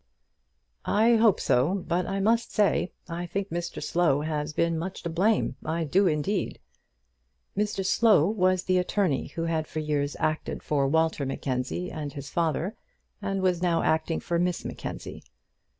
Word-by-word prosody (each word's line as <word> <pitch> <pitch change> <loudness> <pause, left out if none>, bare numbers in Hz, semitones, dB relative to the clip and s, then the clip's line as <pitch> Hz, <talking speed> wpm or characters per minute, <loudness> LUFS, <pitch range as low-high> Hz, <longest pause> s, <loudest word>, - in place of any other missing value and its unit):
"I 225 +3 +3
hope 220 -3 +4
so; 140 +10 +2
but 175 +1 0
I 195 +1 -2
must 230 +3 +2
say, 205 -3 +2 0.2
I 175 +1 -4
think 200 +3 -3
Mr 170 0 -4
Slow 160 -5 +2
has 150 0 -2
been 165 +1 0
much 185 +3 -5
to 170 - -3
blame. 200 +6 +1
I 165 +1 -1
do, 185 +6 +3
indeed." 170 +5 -1 1.0
Mr 205 -1 -1
Slow 210 -4 +5
was 185 -3 +2
the 185 0 +2
attorney 180 -5 0
who 165 - -5
had 160 -2 -1
for - - -8
years 150 -2 -1
acted 155 0 -2
for 140 -2 +1
Walter 160 0 +1
Mackenzie 135 +5 -3
and 150 -3 -5
his 140 -1 -8
father, 170 +3 0 0.5
and 195 -1 -2
was 180 -2 +2
now 175 -2 +2
acting 160 +1 +1
for 170 -1 -1
Miss 180 0 -1
Mackenzie. - - -6
170 Hz, 160 wpm, -27 LUFS, 155-195 Hz, 1.0 s, Slow